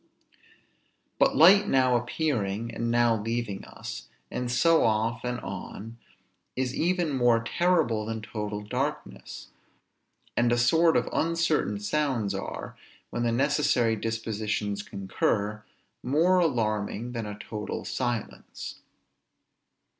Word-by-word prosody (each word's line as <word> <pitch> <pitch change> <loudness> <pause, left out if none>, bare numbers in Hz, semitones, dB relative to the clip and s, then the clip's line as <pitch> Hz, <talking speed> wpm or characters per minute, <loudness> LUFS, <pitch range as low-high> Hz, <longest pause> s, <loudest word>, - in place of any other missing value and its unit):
But - - +4
light 195 +5 +7
now 130 -5 +3
appearing, 120 -4 -1
and 115 0 -2
now 120 -2 +3
leaving 115 -2 -3
us, - - -8 0.2
and 125 -1 -3
so 165 +6 +4
off 110 +2 +1
and 125 0 -2
on, 105 +4 -7 0.6
is 130 0 -1
even 175 -1 0
more 120 -2 +3
terrible 140 -8 +1
than 110 -1 -4
total 105 -1 -4
darkness; 105 - -4 0.9
and 120 0 +2
a 120 - +3
sort 160 +8 +4
of - - 0
uncertain 165 -11 +1
sounds 115 -2 0
are, 95 - -6 0.4
when 120 - -2
the 120 -1 +1
necessary 135 -2 +2
dispositions 105 -2 -2
concur, 100 +2 -2 0.4
more 165 +8 +3
alarming 115 - 0
than 115 -3 -4
a 105 0 -6
total 105 0 -5
silence. 120 -4 -4
120 Hz, 115 wpm, -27 LUFS, 105-140 Hz, 0.9 s, light